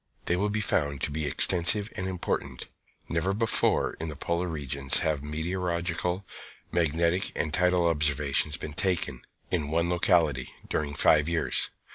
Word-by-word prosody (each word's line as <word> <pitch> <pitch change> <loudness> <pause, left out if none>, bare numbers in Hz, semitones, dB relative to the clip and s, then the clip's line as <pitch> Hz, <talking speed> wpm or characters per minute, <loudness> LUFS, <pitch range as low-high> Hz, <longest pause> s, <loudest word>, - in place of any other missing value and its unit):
They 90 - +1
will 100 +3 0
be 105 +1 -1
found 70 -8 0
to - - -1
be 75 0 -2
extensive 95 +7 +3
and 95 - -3
important. 95 -2 -3 0.4
Never 85 +4 -1
before, 115 +1 +2
in 80 - -4
the 75 - -6
polar 85 +4 -2
regions, 70 -4 0
have 75 -3 0
meteorological, 85 +3 -2 0.5
magnetic 85 +2 +2
and 75 -1 -2
tidal 90 0 +2
observations 75 -1 +1
been 75 - -7
taken, 75 -7 -1 0.3
in 80 -5 0
one 85 +2 0
locality, 85 -7 +2 0.2
during 70 -2 -2
five 75 +2 +4
years. 85 -1 +1
85 Hz, 145 wpm, -27 LUFS, 75-90 Hz, 0.5 s, five